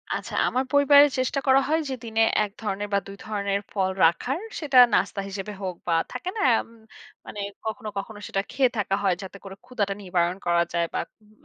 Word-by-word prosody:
আচ্ছা। - - -6
আমার 255 +1 0
পরিবারে 285 0 +7
চেষ্টা 255 +2 0
করা 265 0 +6
হয় 315 +2 +2
যে, - - -2
দিনে 225 -1 0 0.2
১ 205 - -4
ধরনের 205 -1 -3
বা - - +4
২ 195 - -8
ধরনের 200 -2 -1
ফল 190 -2 0 0.2
রাখার, 245 - +1 0.2
সেটা 285 -5 +1 0.2
নাস্তা 195 +2 +1
হিসেবে 195 +1 -6
হোক, 185 -2 -3
বা 170 - +2 0.2
থাকে 250 +9 -4
না - - -1 0.2
এম - - -7 0.6
মানে 210 - -8 0.3
কখনো, 220 0 -4
কখনো 205 +1 -5
সেটা 195 - -1
খেয়ে 260 -2 +3
থাকা 195 -2 0
হয় 190 -3 +3
যাতে 190 +1 -9
করে 195 -1 -9
ক্ষুধাটা 205 -6 -2
নিবারণ 180 -2 0
করা 170 0 +3
যায়, 170 -1 +1
বা - - -1 0.2
উম 210 0 -24
205 Hz, 200 wpm, -25 LUFS, 195-255 Hz, 0.6 s, পরিবারে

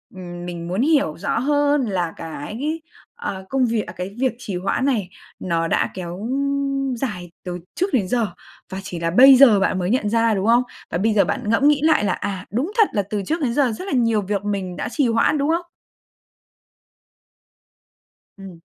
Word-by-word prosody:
ừm, 175 -1 -8
mình 170 -1 -6
muốn 185 +6 -1
hiểu 280 - +2
rõ 200 - -1
hơn 290 +1 +2
là 180 -6 -2
cái, 220 - -5 0.3
à, 200 - -5
công 265 -1 +2
việc 225 -2 0
à, 170 - -7
cái 180 +2 -6
việc 260 -2 +1
trì 205 -6 -6
hoãn 195 +8 -1
này 220 -10 0 0.3
nó 165 -2 -1
đã - - +1
kéo 185 +3 -6 0.7
dài 180 -9 -5
từ 180 0 -4 0.2
trước 375 +2 -1
đến 210 -8 +2
giờ, 230 +2 +1 0.4
và 190 +1 -5
chỉ 180 -3 -6
là 165 0 -1
bây 265 +8 +8
giờ 250 -6 +7
bạn 190 -1 +1
mới 180 0 -1
nhận 210 -3 +1
ra, 230 0 +2
đúng 195 0 -1
không? 240 +2 +5 0.3
Và - - 0
bây 215 +4 +1
giờ 205 - +4
bạn 250 -6 -3
ngẫm 250 +6 +3
nghĩ 295 -1 +4
lại 315 -8 +4
là, 190 -3 +1
"à, 190 -1 -4
đúng 265 - -1
thật 440 -3 +6
là 205 - +2
từ 210 -1 -2
trước 325 - -1
đến 250 -5 0
giờ 265 -2 +2
rất 220 +12 -6
là - - -3
nhiều 230 -4 +2
việc 200 0 -2
mình 195 -3 -3
đã - - -3
trì 280 -1 +1
hoãn", 230 +6 +2
đúng 285 +2 0
không? 340 +2 0 2.7
Ừm. 190 -4 -11
215 Hz, 200 wpm, -21 LUFS, 185-265 Hz, 2.7 s, bây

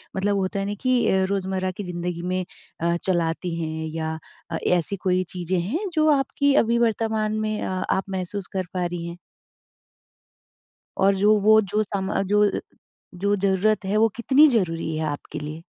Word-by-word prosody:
मतलब 200 +1 +1
होता 195 +1 -1
है 195 - -1
ना 205 - -2
कि 240 -7 +2
रोज़मर्रा 190 -1 -1
की 195 +3 -7
ज़िंदगी 175 -1 -4
में 185 +1 -2 0.4
अ, 170 0 +2
चलाती 170 -1 0
हैं 160 0 -3
या 160 0 -2 0.3
अ, - - -1
ऐसी 180 +2 +1
कोई 185 0 +3
चीज़ें 180 0 -1
हैं 315 - -2
जो 310 -1 +3
आपकी 280 +1 +1
अभी 235 +1 +1
वर्तमान 220 -2 0
में 215 0 -2
अ - - -2 0.2
आप 190 - +1
महसूस 190 +1 -4
कर 185 -1 -1
पा 180 -1 -1
रही 175 -1 -4
हैं? 170 0 -7 1.8
और 195 +1 +4
जो 210 +2 +4
वो 220 +2 +6
जो 210 +1 0
समा 195 -1 -2
जो 210 0 +5
अ, - - -2 0.6
जो 200 +3 +1
ज़रूरत 200 +2 +1
है 200 +2 0
वो 225 +1 +5
कितनी 270 +6 +5
ज़रूरी 165 - 0
है 160 - -1
आपके 145 -1 -5
लिए? 150 +2 -7
190 Hz, 175 wpm, -24 LUFS, 175-215 Hz, 1.8 s, वो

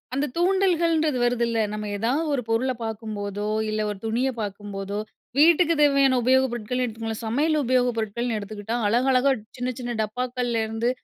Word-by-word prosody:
அந்த 280 - +1
தூண்டல்கள்ன்றது 340 -5 +2
வருதுல்ல. 235 -1 +1
நம்ம 210 -1 -4
ஏதாவது 250 +10 0
ஒரு 270 - 0
பொருளை 255 +3 +1
பார்க்கும்போதோ, 210 -2 -4 0.2
இல்ல 215 0 -1
ஒரு 200 - -7
துணியை 245 +4 0
பார்க்கும்போதோ 200 0 -5 0.4
வீட்டுக்கு 335 +1 +5
தேவையான 275 -2 +4
உபயோகப் 260 +1 +3
பொருட்கள் 240 +2 -2
எடுத்துக்கோங்களேன், 225 -1 -4
சமையல் 300 +8 +1
உபயோகப் 250 -1 +2
பொருட்கள்னு 225 +1 -2
எடுத்துக்கிட்டா, 210 +2 -5
அழகழகா 255 +4 +3 0.3
சின்ன 250 +1 -2
சின்ன 245 -1 -4
டப்பாக்களிலருந்து 235 0 -1
240 Hz, 135 wpm, -24 LUFS, 215-265 Hz, 0.4 s, வீட்டுக்கு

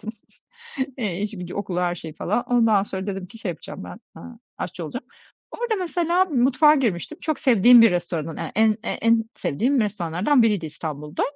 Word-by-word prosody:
bıraktım, 220 - -6 0.9
eee, 200 -7 -3
işi 210 -2 -4
gücü, 180 0 -7
okulu, 185 -3 -3
her 175 -1 0
şeyi 160 -2 -7
falan. 210 +9 -1
Ondan 225 -5 +3
sonra 190 -1 -5
dedim 195 -2 -4
ki 225 - -13
şey 215 - -5
yapacağım 175 +3 -7
ben, - - -10 0.2
eee, - - -11 0.4
aşçı 175 -1 -5
olacağım. 245 - -6 0.5
Orada 475 -2 -2
mesela 350 0 +1
mutfağa 285 0 +4
girmiştim. 245 - -2
Çok 310 -1 -2
sevdiğim 240 -1 +7
bir 225 - +6
restoranın 170 -3 -3
e - - -5
en 220 +1 +4
e - - -4
en 230 0 +2
sevdiğim 250 - 0
restoranlardan 205 - +1
biriydi 205 -7 +1
İstanbul'da. 150 0 -5
210 Hz, 180 wpm, -23 LUFS, 175-245 Hz, 0.9 s, sevdiğim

